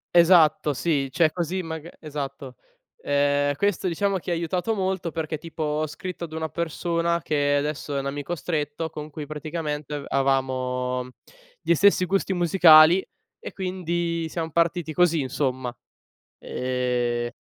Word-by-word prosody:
Esatto 165 Hz, -4 st, +5 dB
sì, 140 Hz, -1 st, 0 dB
cioè 160 Hz, +1 st, +3 dB
così 175 Hz, +2 st, -2 dB
maga 160 Hz, 0 st, -7 dB
esatto. 140 Hz, -3 st, -6 dB, 0.5 s
Ehm, 145 Hz, 0 st, +2 dB
questo 195 Hz, +2 st, 0 dB
diciamo 195 Hz, +3 st, 0 dB
che 180 Hz, 0 st, -5 dB
ha -, -, +2 dB
aiutato 180 Hz, +5 st, -1 dB
molto 190 Hz, -4 st, -2 dB
perché 155 Hz, -1 st, -3 dB
tipo 165 Hz, 0 st, -9 dB
ho 150 Hz, +1 st, -1 dB
scritto 175 Hz, +4 st, -7 dB
ad 160 Hz, -2 st, -7 dB
una 160 Hz, 0 st, -2 dB
persona 170 Hz, +1 st, -1 dB
che 145 Hz, -2 st, +1 dB
adesso 145 Hz, 0 st, -3 dB
è -, -, +1 dB
un 135 Hz, -, -4 dB
amico 145 Hz, +3 st, -4 dB
stretto 155 Hz, -1 st, -3 dB
con 150 Hz, 0 st, -7 dB
cui 150 Hz, 0 st, -6 dB
praticamente 150 Hz, -1 st, -4 dB
a 145 Hz, -, -4 dB
avevamo 130 Hz, -2 st, 0 dB, 0.5 s
gli -, -, +3 dB
stessi 200 Hz, +1 st, +4 dB
gusti 195 Hz, +1 st, 0 dB
musicali 175 Hz, -1 st, +6 dB, 0.3 s
e -, -, -8 dB
quindi 175 Hz, -3 st, -2 dB
siam 165 Hz, 0 st, -3 dB
partiti 170 Hz, 0 st, 0 dB
così, 175 Hz, -1 st, +3 dB
insomma. 130 Hz, -2 st, -2 dB, 0.6 s
Ehm 125 Hz, -2 st, -2 dB
155 Hz, 145 wpm, -24 LUFS, 145-170 Hz, 0.6 s, musicali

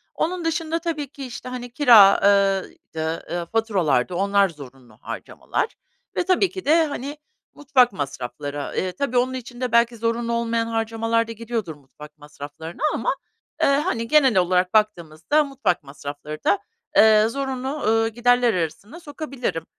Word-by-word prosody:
Onun 345 Hz, +1 st, -2 dB
dışında 330 Hz, 0 st, -1 dB
tabii 315 Hz, -4 st, -3 dB
ki, 275 Hz, 0 st, -9 dB
işte, 250 Hz, 0 st, -8 dB
hani, 250 Hz, -1 st, -6 dB
kira 235 Hz, -7 st, +7 dB
ııı, 195 Hz, -1 st, +3 dB, 0.2 s
dı, 160 Hz, 0 st, -3 dB
eee, 175 Hz, 0 st, -3 dB
faturalardı 185 Hz, -, 0 dB
onlar 200 Hz, +1 st, +2 dB
zorunlu 130 Hz, -7 st, -14 dB
harcamalar. -, -, -4 dB, 0.4 s
Ve -, -, +1 dB
tabii 370 Hz, +1 st, +3 dB
ki 375 Hz, -, -8 dB
de, 320 Hz, +2 st, +4 dB
hani, 285 Hz, 0 st, -5 dB, 0.4 s
mutfak 265 Hz, -5 st, +3 dB
masrafları. 145 Hz, -1 st, -5 dB
Iıı, 185 Hz, -1 st, -1 dB
tabii, 250 Hz, +4 st, -2 dB
onun 255 Hz, +1 st, +1 dB
için 245 Hz, -1 st, -8 dB
de 250 Hz, -2 st, -1 dB
belki 235 Hz, 0 st, +3 dB
zorunlu 230 Hz, +1 st, -1 dB
olmayan 230 Hz, 0 st, 0 dB
harcamalar 225 Hz, 0 st, 0 dB
da -, -, -6 dB
gidiyordur 225 Hz, -7 st, -4 dB
mutfak 150 Hz, +2 st, -15 dB
masraflarına 150 Hz, -, -9 dB
ama, -, -, -1 dB, 0.5 s
ııı, 275 Hz, -, +4 dB
hani, 235 Hz, -9 st, -2 dB
genel 270 Hz, -7 st, +4 dB
olarak 180 Hz, +1 st, +2 dB
baktığımızda 180 Hz, -, +1 dB
mutfak 260 Hz, -, -1 dB
masrafları 145 Hz, +2 st, -8 dB
da, 200 Hz, -1 st, +3 dB, 0.4 s
ııı, 215 Hz, 0 st, +6 dB
zorunlu, 265 Hz, 0 st, -3 dB
ııı, 225 Hz, -6 st, +1 dB
giderler 245 Hz, +1 st, +2 dB
arasına 185 Hz, -, -4 dB
sokabilirim. 275 Hz, -, -5 dB
225 Hz, 150 wpm, -23 LUFS, 175-265 Hz, 0.5 s, kira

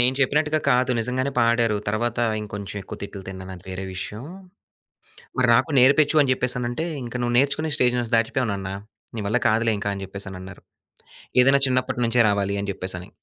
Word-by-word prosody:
నేను 125 Hz, +2 st, +3 dB
చెప్పినట్టుగా 150 Hz, +3 st, +2 dB
కాదు 125 Hz, 0 st, +3 dB
నిజంగానే 130 Hz, +4 st, -1 dB
పాడారు. 115 Hz, -2 st, +2 dB
తరువాత, 115 Hz, +3 st, -1 dB, 0.2 s
ఇంకొంచెం 105 Hz, -1 st, -7 dB
ఎక్కువ -, -, -8 dB
తిట్లు 100 Hz, -1 st, -7 dB
తిన్నాను 95 Hz, 0 st, -8 dB
అది 90 Hz, -, -16 dB
వేరే 95 Hz, +1 st, -5 dB
విషయం. 105 Hz, +6 st, -6 dB, 1.1 s
మరి 125 Hz, -1 st, +3 dB
నాకు 125 Hz, +7 st, +2 dB
నేర్పించు 145 Hz, +4 st, +4 dB
అని 135 Hz, -, 0 dB
చెప్పేసనంటే, 125 Hz, +3 st, -1 dB, 0.2 s
"ఇంక 120 Hz, -, -8 dB
నువ్వు 120 Hz, 0 st, 0 dB
నేర్చుకునే 140 Hz, +4 st, +1 dB
స్టేజ్ 125 Hz, -4 st, +2 dB
నుంచి 120 Hz, -1 st, -1 dB
దాటిపోయావు 115 Hz, +1 st, 0 dB
నాన్న, 95 Hz, -1 st, -4 dB, 0.5 s
నీ -, -, -3 dB
వల్ల 120 Hz, -, +2 dB
కాదులే" 115 Hz, 0 st, +2 dB, 0.2 s
అని 100 Hz, -, -7 dB
చెప్పేసి 95 Hz, 0 st, -6 dB
అనన్నారు. 95 Hz, 0 st, -10 dB, 0.8 s
ఏదైనా 135 Hz, +2 st, +5 dB
చిన్నప్పటి 125 Hz, -1 st, 0 dB
నుంచే 115 Hz, +1 st, +4 dB
రావాలి 100 Hz, 0 st, 0 dB
అని 100 Hz, -, -3 dB
చెప్పేసని. 95 Hz, 0 st, -4 dB
120 Hz, 170 wpm, -23 LUFS, 100-130 Hz, 1.1 s, ఏదైనా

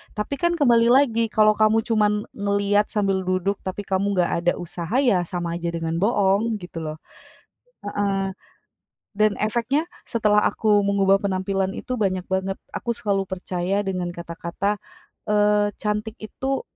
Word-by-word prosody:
Tapi 220 Hz, +6 st, -3 dB
kan 345 Hz, +2 st, +2 dB
kembali 240 Hz, -7 st, +4 dB
lagi 240 Hz, -3 st, +4 dB
kalau 215 Hz, -1 st, +4 dB
kamu 215 Hz, +1 st, +3 dB
cuman 210 Hz, -2 st, +1 dB
ngelihat 200 Hz, 0 st, +1 dB
sambil 195 Hz, -3 st, -1 dB
duduk 185 Hz, +2 st, 0 dB
tapi 190 Hz, +2 st, -5 dB
kamu 200 Hz, +1 st, 0 dB
nggak 180 Hz, -2 st, +2 dB
ada 175 Hz, +1 st, +2 dB
usaha 175 Hz, +3 st, -5 dB
ya 185 Hz, -9 st, +2 dB
sama 170 Hz, -1 st, -3 dB
aja 170 Hz, -, -3 dB
dengan 165 Hz, -1 st, -2 dB
boong 205 Hz, +2 st, +2 dB
gitu 175 Hz, -2 st, -7 dB
loh 155 Hz, -1 st, -5 dB, 0.9 s
heeh, 200 Hz, -1 st, -1 dB, 0.9 s
dan 215 Hz, 0 st, +3 dB
efeknya 240 Hz, +9 st, 0 dB, 0.2 s
setelah 210 Hz, -2 st, +2 dB
aku 210 Hz, -2 st, +2 dB
mengubah 200 Hz, -1 st, +3 dB
penampilan 190 Hz, 0 st, -1 dB
itu 255 Hz, +4 st, -4 dB
banyak 185 Hz, -5 st, -1 dB
banget 190 Hz, +1 st, -2 dB, 0.2 s
aku 235 Hz, -, -2 dB
selalu 200 Hz, -4 st, -1 dB
percaya 185 Hz, 0 st, -2 dB
dengan 180 Hz, -2 st, -2 dB
kata-kata, 170 Hz, +4 st, -3 dB, 0.6 s
eee, 210 Hz, 0 st, +3 dB
cantik 210 Hz, +1 st, -2 dB
itu 265 Hz, +5 st, -3 dB
200 Hz, 145 wpm, -23 LUFS, 185-215 Hz, 0.9 s, kembali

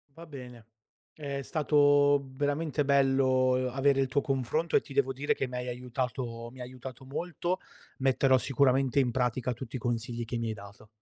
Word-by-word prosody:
Va 165 Hz, +1 st, -11 dB
bene, 125 Hz, -6 st, -10 dB, 0.5 s
è 140 Hz, -2 st, -5 dB
stato 145 Hz, -2 st, +4 dB
veramente 145 Hz, +1 st, 0 dB
bello, 135 Hz, -2 st, +3 dB
uhm, 130 Hz, 0 st, +1 dB
avere 135 Hz, 0 st, +3 dB
il 135 Hz, -, +1 dB
tuo 140 Hz, +2 st, +1 dB
confronto 140 Hz, +5 st, -1 dB
e -, -, +6 dB
ti -, -, -12 dB
devo 135 Hz, -1 st, +2 dB
dire 140 Hz, +3 st, 0 dB
che 135 Hz, -, -2 dB
m'hai 125 Hz, 0 st, -5 dB
aiutato 125 Hz, -1 st, -4 dB
mi 130 Hz, -, -15 dB
ha -, -, -4 dB
aiutato 130 Hz, +1 st, -10 dB
molto, 175 Hz, +6 st, -3 dB, 0.4 s
metterò 130 Hz, 0 st, +3 dB
sicuramente 135 Hz, +1 st, +2 dB
in 125 Hz, -3 st, +3 dB
pratica 125 Hz, 0 st, 0 dB
tutti 130 Hz, +2 st, -7 dB
i -, -, -3 dB
consigli 120 Hz, 0 st, -2 dB
che 120 Hz, +1 st, -4 dB
mi 115 Hz, -1 st, -2 dB
hai 110 Hz, -, -2 dB
dato. 100 Hz, +1 st, -13 dB
130 Hz, 180 wpm, -29 LUFS, 125-140 Hz, 0.5 s, e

